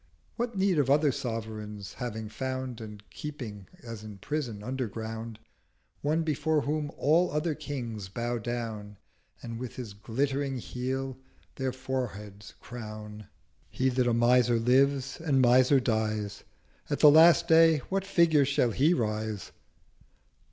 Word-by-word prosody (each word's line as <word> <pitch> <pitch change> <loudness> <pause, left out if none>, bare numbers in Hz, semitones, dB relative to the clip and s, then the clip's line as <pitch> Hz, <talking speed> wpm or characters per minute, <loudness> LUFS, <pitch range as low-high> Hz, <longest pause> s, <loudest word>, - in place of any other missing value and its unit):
What 240 -3 -3
need 190 -4 +2
of 135 -2 +2
other 145 +1 +4
Sovereign, 110 -4 -5 0.2
having 110 -3 -4
found, 130 0 -4
And 105 -1 -10
keeping 120 -10 -7 0.2
as 115 -3 -8
in 105 -2 -9
Prison 120 -3 -4
underground, 115 -2 -4 0.6
One 155 +3 +1
before 155 0 +1
whom 150 +1 -2
all 165 +5 +3
other 150 +2 0
Kings 120 -10 -5
bow 120 +3 -2
down, 110 -3 -5 0.5
And 115 -1 -6
with 125 -1 -6
his 120 -5 -7
glittering 135 +6 -2
Heel 130 +2 -4 0.3
their 130 -1 -2
Foreheads 105 -6 -5
crown?' 105 -3 -8 0.4
'He 130 +1 0
that 125 -1 +1
a 120 - +2
Miser 120 0 +4
lives 135 +3 +2
and 145 -5 +2
Miser 130 +2 +5
dies, 110 -4 -2 0.4
At - - -1
the 150 - +9
Last 170 +2 +7
Day 165 -1 +6
what 195 0 0
Figure 170 -6 +4
shall 135 -3 +2
he 150 +10 +3
rise?' 110 -3 -2
125 Hz, 135 wpm, -29 LUFS, 110-145 Hz, 0.6 s, the